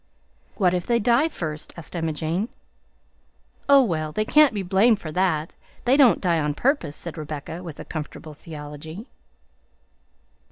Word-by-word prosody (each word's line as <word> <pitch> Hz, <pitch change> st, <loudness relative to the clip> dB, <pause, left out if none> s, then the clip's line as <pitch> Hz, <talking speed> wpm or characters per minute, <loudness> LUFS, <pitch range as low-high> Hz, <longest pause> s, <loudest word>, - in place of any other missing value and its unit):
"What 185 Hz, -4 st, +2 dB
if 180 Hz, -1 st, -2 dB
they 235 Hz, -, +3 dB
die 240 Hz, +7 st, +3 dB
first?" 155 Hz, -, -6 dB
asked 170 Hz, +1 st, -9 dB
Emma 165 Hz, -2 st, -1 dB
Jane. 165 Hz, -, -2 dB, 1.2 s
"Oh, 280 Hz, -1 st, +8 dB
well, 155 Hz, -8 st, -2 dB
they 215 Hz, +7 st, -1 dB
can't 300 Hz, +4 st, +6 dB
be 205 Hz, -3 st, -3 dB
blamed 200 Hz, +5 st, +3 dB
for 155 Hz, -, -7 dB
that; 165 Hz, -3 st, 0 dB, 0.3 s
they 250 Hz, +2 st, +5 dB
don't 260 Hz, -, +6 dB
die 170 Hz, -3 st, +1 dB
on 150 Hz, -1 st, -1 dB
purpose," 240 Hz, -, 0 dB
said 170 Hz, -1 st, -6 dB
Rebecca, 155 Hz, +2 st, -6 dB
with 165 Hz, -5 st, -9 dB
a -, -, -7 dB
comfortable 155 Hz, 0 st, -7 dB
theology. 155 Hz, +4 st, -9 dB
170 Hz, 155 wpm, -24 LUFS, 155-215 Hz, 1.2 s, Oh